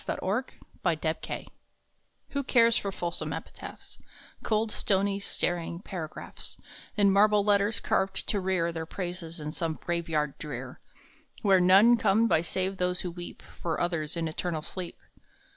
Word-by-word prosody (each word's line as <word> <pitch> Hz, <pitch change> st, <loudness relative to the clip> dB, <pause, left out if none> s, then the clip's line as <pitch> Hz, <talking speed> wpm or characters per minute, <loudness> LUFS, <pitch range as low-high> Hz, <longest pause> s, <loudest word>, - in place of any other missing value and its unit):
AS -, -, -14 dB
TO 210 Hz, +7 st, 0 dB, 0.4 s
EPITAPHS -, -, -2 dB, 0.8 s
WHO 280 Hz, 0 st, -1 dB
cares 230 Hz, -3 st, +5 dB
for 200 Hz, -, -1 dB
fulsome 175 Hz, -2 st, -3 dB
epitaphs, -, -, -9 dB, 0.4 s
Cold, 215 Hz, 0 st, +1 dB
stony, 200 Hz, 0 st, +1 dB
staring 175 Hz, -3 st, -1 dB
paragraphs, 175 Hz, -5 st, -8 dB, 0.4 s
In 200 Hz, -1 st, +5 dB
marble 205 Hz, +1 st, +5 dB
letters 205 Hz, +1 st, +3 dB
carved 190 Hz, 0 st, +2 dB
to 205 Hz, -, +2 dB
rear 185 Hz, -3 st, +1 dB
Their 160 Hz, -1 st, -5 dB
praises 175 Hz, -2 st, -5 dB
in 150 Hz, 0 st, -4 dB
some 165 Hz, -1 st, -2 dB
graveyard 160 Hz, -4 st, -1 dB
drear, 150 Hz, -, -6 dB, 0.6 s
Where 195 Hz, -3 st, +5 dB
none 200 Hz, +7 st, +7 dB
come 225 Hz, +1 st, +3 dB
by 160 Hz, -, +3 dB
save 190 Hz, +2 st, 0 dB
those 180 Hz, -1 st, 0 dB
who 180 Hz, -, -4 dB
weep 175 Hz, 0 st, -9 dB, 0.2 s
For 165 Hz, -2 st, -1 dB
others 170 Hz, -2 st, -1 dB
in 165 Hz, -1 st, -1 dB
eternal 160 Hz, 0 st, -3 dB
sleep? 180 Hz, 0 st, -6 dB
185 Hz, 145 wpm, -29 LUFS, 170-200 Hz, 0.8 s, none